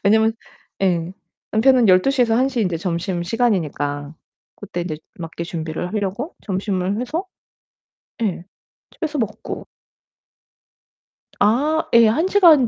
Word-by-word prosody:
왜냐면 220 +2 +4 0.5
예. 175 -1 +1 0.4
남편은 245 +1 +4
12:00 250 +9 +4
에서 225 -2 +2
1:00 260 0 +1
에 - - +3
인제 180 -4 0
점심시간이니까 170 - -1 0.4
그때 190 -3 -5
인제 155 -3 -4 0.2
맞게 165 0 -5
준비를 165 0 -4
하려고 205 - -2
점심을 195 0 -1
해서 315 +9 -2 1.0
예. 185 -5 -1 0.5
집에서 305 -3 -4
먹고. 215 -1 -4 1.7
아 285 +10 +2
예. 230 -1 +8
1 315 +12 +2
시간 335 - +6
205 Hz, 220 characters per minute, -21 LUFS, 175-245 Hz, 1.7 s, 예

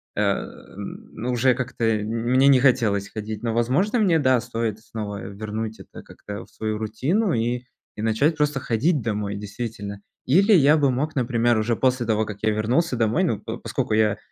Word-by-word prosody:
э, - - 0
м, - - -4
ну, 120 +3 -3
уже 125 +1 +3
как-то 125 -2 -4
мне 115 +4 +2
не 135 -2 +6
хотелось 110 -7 +2
ходить, 110 0 -6
но, 115 - -1
возможно, 145 - +1
мне, 180 -6 +3
да, 130 -3 +3
стоит 115 -2 -3
снова 105 -3 -6
вернуть 110 +2 -5
это - - -12
как-то 105 0 -9
в - - -26
свою 110 -1 -3
рутину 135 - 0
и 120 +2 -1 0.3
и - - -4
начать 115 +9 +1
просто 145 -3 0
ходить 140 +7 +1
домой 105 -2 -2
действительно. 100 0 -6 0.3
Или 195 - +4
я 150 -3 +6
бы 140 -3 +3
мог, 140 +5 -1
например, 120 -2 +2
уже 110 +2 +1
после 130 0 +1
того, 110 -1 +1
как 105 -1 -7
я 110 - +3
вернулся 120 +8 +1
домой, 115 - +1
ну, 115 - -1
по - - -5
поскольку - - -3
я 110 -1 +3
115 Hz, 185 wpm, -23 LUFS, 110-135 Hz, 0.3 s, не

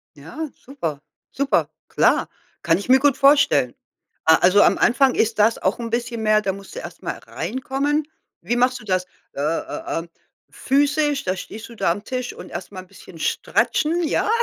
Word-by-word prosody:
Ja, 250 - -7
super, 165 - -6 0.3
super, 275 0 +1 0.2
klar. - - +2 0.3
Kann 165 -1 +3
ich 200 - -7
mir 260 +1 +7
gut 285 -1 +3
vorstellen. 275 - +4 0.5
Ah 160 0 +7
also 185 +3 +6
am - - +4
Anfang 260 +1 +3
ist 225 0 +1
das 220 +2 +4
auch - - 0
'n 230 -1 -4
bisschen 235 0 -2
mehr 215 0 +4
da 195 -2 -1
musst 195 - -11
du - - -4
erst - - -9
mal - - -3
reinkommen. 275 +4 -2 0.3
Wie 240 - -1
machst 250 +1 +2
du - - -13
das? 185 -2 0 0.3
Äh 140 - -4
äh, 160 +2 -2
ähm, 170 +1 -9 0.4
physisch, 285 +1 +1
da 185 0 -1
stehst 220 +4 -8
du 235 - -12
da 170 - +1
am 205 +4 -4
Tisch 255 0 -4
und - - -11
erst 175 +3 -7
mal 185 - -6
'n 185 - -17
bisschen 180 -3 -14
stratchen, 330 - 0
ja? 310 - 0
235 Hz, 190 wpm, -22 LUFS, 185-275 Hz, 0.5 s, mir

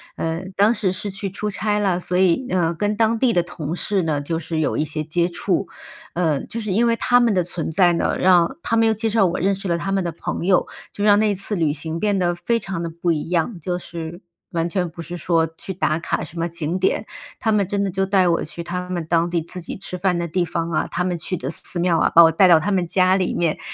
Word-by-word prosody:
嗯， 165 +4 -4
当 205 +4 +4
时 200 -4 0
是 195 +2 -4
去 195 0 -4
出 210 +2 -4
差 210 +1 -1
了， 190 -4 +1
所 180 0 -1
以， 190 +7 +2
呃， 170 -2 +1
跟 205 +4 -1
当 225 0 +2
地 250 -1 +3
的 175 -3 +2
同 170 -2 -5
事 200 +1 0
呢 155 -4 -1
就 160 +3 -3
是 160 0 -3
有 155 - 0
一 - - +1
些 155 0 -3
接 170 +3 0
触。 185 +1 -1 0.5
嗯， 160 -5 0
就 230 - -4
是 215 -3 -3
因 230 +5 +3
为 230 - +3
他 245 +1 +3
们 235 -5 +2
的 180 - +2
存 165 -2 -3
在 175 0 +4
呢， - - 0
让 180 +6 +3
他 230 - 0
们 225 0 +4
又 220 - +3
介 220 +2 -1
绍 215 -3 +3
我 170 - -2
认 195 +1 +2
识 195 0 -5
了 170 - +1
他 195 +3 -3
们 195 -1 +1
的 170 - -2
朋 170 +2 -4
友， 185 - +4 0.3
就 205 - -4
让 205 -1 +6
那 210 -2 +2
次 200 +2 -3
旅 160 -4 +1
行 160 +2 -3
变 205 -2 +1
得 175 -1 +1
非 175 +7 0
常 190 -5 -4
地 170 - -3
不 170 +1 -1
一 155 +1 -2
样， 175 +3 -1
就 175 +2 -2
是 170 0 -7 0.3
完 165 0 -1
全 180 0 -1
不 165 0 -9
是 175 +3 -7
说 165 -1 +1
去 190 - -6
打 160 -2 0
卡 - - -2
什 170 0 -8
么 170 +1 -1
景 170 +2 -3
点。 185 - 0 0.3
他 225 - 0
们 205 -3 +2
真 200 0 -1
的 195 - -1
就 195 +1 0
带 190 -2 +3
我 170 -1 +1
去 170 +2 -7
他 180 +1 -5
们 175 -3 -3
当 170 +1 +2
地 170 -2 -1
自 180 +2 -7
己 - - -6
吃 190 -1 -5
饭 180 -1 0
的 170 - -2
地 175 +2 0
方 165 0 -3
啊、 155 - 0
他 180 - -2
们 180 -1 -1
去 185 +2 -3
的 135 +1 -4
寺 170 - +2
庙 170 -2 +2
啊， - - +3
把 170 - +8
我 165 - +6
带 185 +4 +5
到 170 -2 +7
他 195 +6 -2
们 180 -3 +1
家 185 +1 +3
里 185 -2 0
面， 170 -3 0
180 Hz, 290 characters per minute, -21 LUFS, 170-195 Hz, 0.5 s, 把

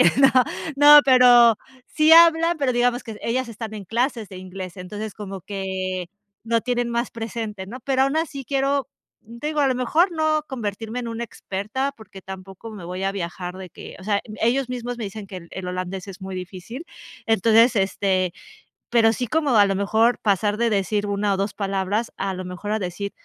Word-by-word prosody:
Ay, - - +7
no, 270 -1 +7 0.5
no, 295 +1 +9
pero 245 -3 +7 0.3
sí 310 0 +3
hablan, 335 0 +7
pero 275 -3 +1
digamos 245 +1 +1
que 220 -3 -8
ellas 250 +1 -1
están 220 -1 -7
en 205 - -7
clases 230 +1 -1
de 185 - -10
inglés. 185 -1 -8
Entonces, 205 +3 -6
como 195 -2 -7
que 185 -2 -4 0.4
lo 230 0 +1
tienen 245 0 -1
más 235 +1 -1
presente, 225 -3 -5
¿no? 250 +6 -8
Pero 265 +1 +1
aun 275 +3 +1
así 310 -4 -2
quiero, 275 +1 0 0.4
n 235 +2 -11
te 300 - -2
digo, 305 -1 -1
a 275 - +3
lo 255 - +1
mejor 320 +9 +2
no 310 -1 +1
convertirme 225 -2 -5
en 240 - -5
una 230 +1 -4
experta, 220 +7 -4
porque 205 -3 -13
tampoco 190 +3 -9
me 205 -5 -9
voy 180 +2 -5
a 195 0 0
viajar 180 -1 -5
de 185 -2 -9
que, - - -11
o 190 - -12
sea, 205 -1 +1
em, 215 - -10
ellos 250 +3 +1
mismos 245 -1 -4
me 225 - -4
dicen 200 +1 -7
que 190 -1 -9
el 170 -2 -10
el 190 -1 -6
holandés 185 +2 -4
es 195 0 -10
muy 190 0 -6
difícil. 185 - -8 0.4
Entonces, 225 +2 +4
este, 190 -2 +1 0.6
pero 225 -1 +4
sí 245 +3 -3
como 290 -2 +1
a 205 - +7
lo 195 - 0
mejor 220 +5 +2
pasar 205 0 +1
de 235 +1 +1
decir 205 0 0
una 200 0 0
o - - -1
2 200 +2 -2
palabras, 195 +2 -2
a 195 -1 -2
lo 185 0 -6
mejor 180 +3 -5
a 215 - +1
decir 200 +1 -4
220 Hz, 205 wpm, -23 LUFS, 195-250 Hz, 0.6 s, no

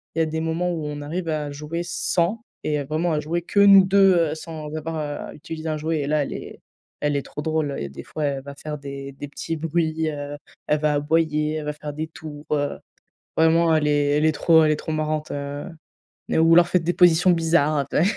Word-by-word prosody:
il - - -1
y 160 - +4
a - - +1
des 160 +1 -3
moments 165 +2 -1
où 160 -3 -3
on 145 0 -5
arrive 165 +4 -4
à 150 -2 -2
jouer 150 +4 -4
sans 175 +5 0 0.2
et 150 -1 -1
vraiment 160 +4 -1
à 150 - +1
jouer 170 +3 -2
que 200 - 0
nous 200 -1 +8
2. 195 0 +5 0.2
Heu, - - -3
sans 155 -2 -7
avoir 160 +1 -4 0.3
à - - -9
utiliser 160 +1 -6
un 155 - -1
jouet 155 0 -1
et 140 - -3
là 150 -1 +2
elle - - -5
est - - -9 0.4
elle 145 -1 +1
est 140 - +1
trop - - -7
drôle 155 -2 -1
et 70 - -3
des 70 - -9
fois 155 - -4
elle 135 -2 -2
va 140 0 -8
faire 150 +1 -6
des 140 -1 -7
des 145 +2 -7
petits 165 - -4
bruits, 160 0 0
heu, 145 0 -6 0.3
elle 150 0 +2
va 150 -1 +1
aboyer, 150 0 +1
elle 155 - -3
va 150 - -1
faire 150 -1 -7
des 155 +2 -4
tours, 155 -2 -10
heu, 145 -1 -1 0.6
vraiment, 160 0 +4
elle 150 -1 +2
est 145 0 +2
elle 155 - +3
est 155 - +4
trop 160 +1 +4
elle 155 - +3
est 150 - +1
trop 160 - -5
marrante. 155 0 -2
Heu, 140 0 -4 0.7
n - - +2
ou 165 +1 +5
alors 175 0 +7
faire 180 - +2
des 175 - 0
positions 180 0 +5
bizarres 165 -3 +2
après. 140 +2 0
155 Hz, 240 wpm, -23 LUFS, 145-165 Hz, 0.7 s, nous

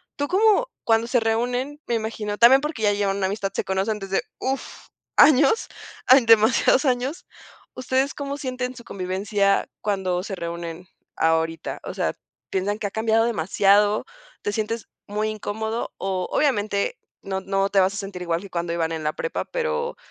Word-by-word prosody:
Tú 285 - -2
como, 435 +7 +3 0.2
cuando 225 0 +3
se 245 +1 +2
reúnen, 245 +5 -1
me 235 - -2
imagino 220 -2 -3
también 260 +3 +7
porque 300 -5 -4
ya 205 -1 +4
llevan 200 -1 0
una 190 -1 0
amistad, 195 0 -3
se - - -1
conocen 195 +3 -1
desde, 195 -1 -1 0.2
uff, 265 +1 -4 0.3
años, 295 - +5 0.4
hay, 260 -1 +7
demasiados 225 +4 +5
años. 260 +4 -1 0.5
¿Ustedes 260 +2 0
cómo 280 0 -4
sienten 255 -2 -4
su 240 - -11
convivencia 200 +1 0
cuando 190 -3 -1
se 200 - -6
reúnen 170 0 -6 0.3
ahorita?, 160 0 0
o - - -6
sea, - - -1 0.4
¿piensan 205 +3 -1
que 205 - -1
ha - - -8
cambiado 225 +1 +2
demasiado? 205 +1 +3 0.4
¿Te 205 - -2
sientes 220 +1 -3 0.2
muy 210 +1 -1
incómodo? 220 +2 -3
O, 185 -1 -2
obviamente, 215 - +1 0.2
no 190 -1 -3
no 195 +1 0
te 200 - +3
vas 190 +2 +2
a - - -5
sentir 195 -3 -6
igual 170 -1 -1
que 200 - -10
cuando 170 -1 -3
iban 165 -1 -1
en 160 - -4
la 150 - 0
prepa 480 - -3
pero 480 0 -2
210 Hz, 170 wpm, -23 LUFS, 195-250 Hz, 0.5 s, también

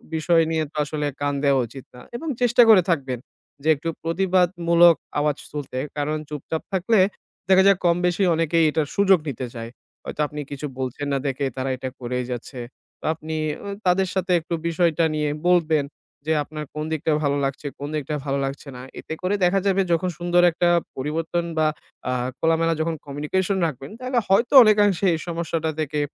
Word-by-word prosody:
বিষয় 165 +1 +3
নিয়ে 160 -1 +1
তো - - -32
আসলে 150 0 -3
কান 145 0 0
দেওয়া 135 -2 +4
উচিত 130 +3 -11
না 125 - -11
এবং 320 +7 -5
চেষ্টা 245 0 +5
করে 210 -4 +8
থাকবেন 135 -7 -1 0.4
যে - - -3
একটু 155 +4 -4
প্রতিবাদমূলক 175 -1 +3 0.2
আওয়াজ 150 -1 +1
তুলতে, 140 -3 -5 0.2
কারণ 150 +1 -1
চুপচাপ 150 +2 -4
থাকলে 190 +3 +2 0.5
দেখা 190 0 +6
যায় 200 -2 +5
কম 170 -1 +4
বেশি 180 +2 +1
অনেকেই 165 0 +2
এটার 150 -1 0
সুযোগ 195 -2 +5
নিতে 130 -1 -4
চায়। 115 0 -6 0.3
হয়তো - - -4
আপনি 150 +1 -8
কিছু 145 +1 -5
বলছেন 130 +2 -3
না - - +2
দেখে 140 +1 -1
তারা 130 +1 -2
এটা 130 +1 -4
করেই 125 0 -3
যাচ্ছে। 125 +2 -6 0.4
তো - - -11
আপনি 160 0 -6 0.3
ঐ - - -6 0.2
তাদের 185 +1 +3
সাথে 185 -1 -1
একটু 165 +1 -6
বিষয়টা 170 -1 +2
নিয়ে 150 -1 0 0.2
বলতেন 160 -4 +3 0.4
যে 160 - 0
আপনার 150 +1 -7
কোন 150 - -4
দিকটা 160 0 -1
ভালো 145 0 +1
লাগছে? 135 +2 -4
কোন 145 - -4
দিকটা 150 0 -3
ভালো 140 0 0
লাগছে 135 +2 -6
না? 125 - -8 0.2
এতে - - -6
করে 185 +2 0
দেখা 180 +2 +3
যাবে 195 0 +3
যখন 170 +2 +1
সুন্দর 175 0 +2
একটা 175 +1 +1 0.3
পরিবর্তন 160 +5 -2
বা 155 -1 +3 0.4
আ - - +1 0.3
খোলামেলা 165 0 +2
যখন 165 0 -1
communication 150 +7 -1
রাখবেন, 135 -2 -7
তাহলে 255 0 -2
হয়তো 225 +7 +2
অনেকাংশে 205 -3 +3
এই - - -5
সমস্যাটা 165 -1 -2
থেকে 150 -1 -1
160 Hz, 180 wpm, -23 LUFS, 145-175 Hz, 0.5 s, করে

